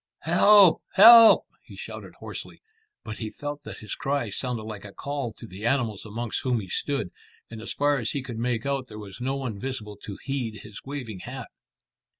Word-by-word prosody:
"Help! 205 -4 +6
help!" 225 +3 +9 0.2
he - - -14
shouted - - -9
hoarsely, - - -9 0.4
but 110 - -7
he 110 - -4
felt 145 +5 -6
that - - -9
his 105 - -7
cry 135 -6 -2
sounded 120 0 -3
like 110 -2 -8
a 100 - -10
call 140 0 -4
to 115 - -10
the 100 -1 -10
animals 120 -5 0
amongst 115 +1 -4
whom 125 -3 0
he 100 - -7
stood, 120 -4 -2 0.4
and 110 -1 -8
as - - -5
far 145 0 +1
as 115 - -2
he 140 - -3
could 120 -3 -7
make 120 +1 -1
out 135 -2 -1
there 105 - -10
was 105 +2 -10
no 135 +2 -1
one 125 -7 -4
visible 115 -5 -5
to 100 -1 -9
heed 120 -7 -3
his 105 -1 -11
waving 130 -8 -6
hat. - - -8
120 Hz, 195 wpm, -26 LUFS, 110-140 Hz, 0.4 s, help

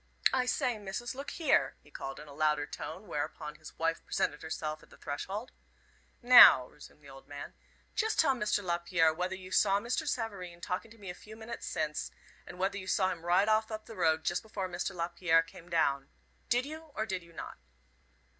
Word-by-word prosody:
I 255 -1 +2
say, 250 -4 0
Missus, 205 +5 -4
look 275 +2 -6
here," 325 - +2
he - - -20
called 135 0 -6
in 150 - -10
a 145 - -11
louder 150 0 +2
tone, 180 +8 -7
whereupon 150 -2 -4
his - - -12
wife 165 0 0
presented 145 - -1
herself 155 -1 -4
at - - -19
the - - -16
threshold. 195 - -5 0.7
"Now," 245 - +10
resumed 150 0 -15
the 140 - -13
old 135 0 -14
man, 145 0 -8 0.4
"just 440 -1 0
tell 280 -4 +5
Mr. 210 -4 0
Lapierre 170 -2 +2
whether 180 +3 -2
you 185 0 -10
saw 200 +1 +4
Mr. 250 +8 -2
Savareen 200 -9 -3
talking 180 +6 -3
to 225 - -16
me 195 -4 -7
a - - -7
few 215 +4 -12
minutes 225 +1 -7
since, 150 -1 -2 0.4
and - - -9
whether 195 +2 0
you 185 - -9
saw 190 0 +2
him 170 -2 -6
ride 180 +4 +3
off 220 0 +3
up 215 0 -5
the 225 - -10
road 160 -3 +2
just - - 0
before 210 -4 -4
Mr. 180 +2 -3
Lapierre 170 -1 +2
came 165 +1 -14
down. 140 -5 +1 0.4
Did 245 +2 +2
you, 315 +1 -9
or 220 - -1
did 190 -4 -3
you 170 0 -17
not?" - - -8
185 Hz, 200 wpm, -32 LUFS, 160-220 Hz, 0.7 s, Now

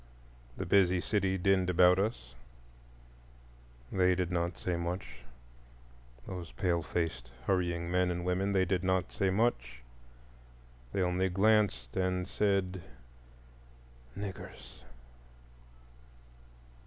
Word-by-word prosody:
The 95 - -3
busy 90 -1 +4
city 95 +1 0
dinned 95 0 +2
about 90 +1 +5
us; 105 - -2 1.6
they 90 -1 +3
did 90 -1 -2
not 85 0 -1
say 90 - -2
much, 85 +3 -4 1.1
those 90 -4 -7
pale 85 -3 0
faced 80 -6 -3 0.2
hurrying 85 -2 0
men 90 0 +2
and 90 0 -3
women; 95 +2 0
they 95 -1 +3
did 90 -1 0
not 95 -1 0
say 95 - 0
much,—they - - -5
only 90 +1 +1
glanced 95 - +2
and 90 -1 0
said, 95 -3 0 1.4
"Niggers!" 100 -10 -8
90 Hz, 100 wpm, -31 LUFS, 85-95 Hz, 1.6 s, about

